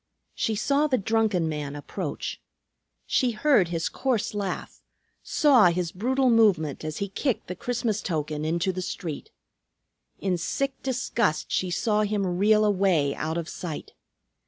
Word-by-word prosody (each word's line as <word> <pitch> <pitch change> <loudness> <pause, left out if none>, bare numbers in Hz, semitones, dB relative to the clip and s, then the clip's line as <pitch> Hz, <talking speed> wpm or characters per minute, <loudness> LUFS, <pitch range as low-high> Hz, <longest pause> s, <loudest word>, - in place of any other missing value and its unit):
She 220 - -1
saw 280 +7 +2
the 260 -3 +2
drunken 215 -5 +1
man 150 -2 -4
approach. 145 - -5 0.6
She 255 - +2
heard 220 - +3
his 165 -1 -1
coarse 250 -7 -1
laugh; 200 -3 -4 0.4
saw 275 -7 +4
his 175 -1 0
brutal 255 +7 +1
movement 185 -12 +3
as 155 0 -4
he 200 - -2
kicked 250 +5 -1
the 180 - -6
Christmas 235 -2 -2
token 150 -3 -2
into 170 +4 0
the 185 0 -4
street. 165 -4 -5 0.9
In 185 -3 0
sick 275 +10 -1
disgust 240 - -1
she 185 - 0
saw 210 +4 +1
him 200 -4 -1
reel 215 +1 +4
away 185 -8 +2
out 160 +2 -3
of 170 -2 -3
sight. 165 -4 -6
195 Hz, 145 wpm, -26 LUFS, 165-225 Hz, 0.9 s, saw